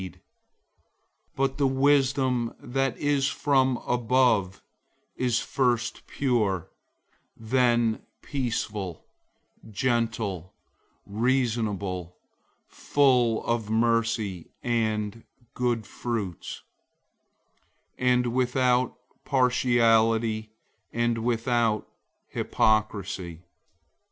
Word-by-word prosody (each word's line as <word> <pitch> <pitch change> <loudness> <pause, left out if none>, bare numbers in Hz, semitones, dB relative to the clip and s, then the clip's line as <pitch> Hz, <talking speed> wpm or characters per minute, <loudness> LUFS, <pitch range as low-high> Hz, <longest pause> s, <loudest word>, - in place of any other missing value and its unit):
003:017 95 -3 -8 1.2
But 135 0 0
the 140 - +4
wisdom 135 -3 +2
that 135 -1 -1
is 145 -1 +1
from 135 -3 +2
above 120 -5 +2 0.5
is 125 -2 +1
first 120 -2 -1
pure, 110 - 0 0.7
then 120 -1 +2 0.2
peaceful, 105 - -3 0.6
gentle, 110 -6 -1 0.5
reasonable, 105 -6 -1 0.5
full 125 -5 +2
of 115 -3 -1
mercy 115 -4 0
and 110 -2 -1 0.3
good 120 -3 -1
fruits, 105 -8 -5 1.4
without 125 0 +2 0.3
partiality, 115 -4 +2 0.4
and 120 0 0
without 115 -1 0 0.4
hypocrisy. 95 -5 -1
120 Hz, 65 wpm, -26 LUFS, 110-125 Hz, 1.4 s, the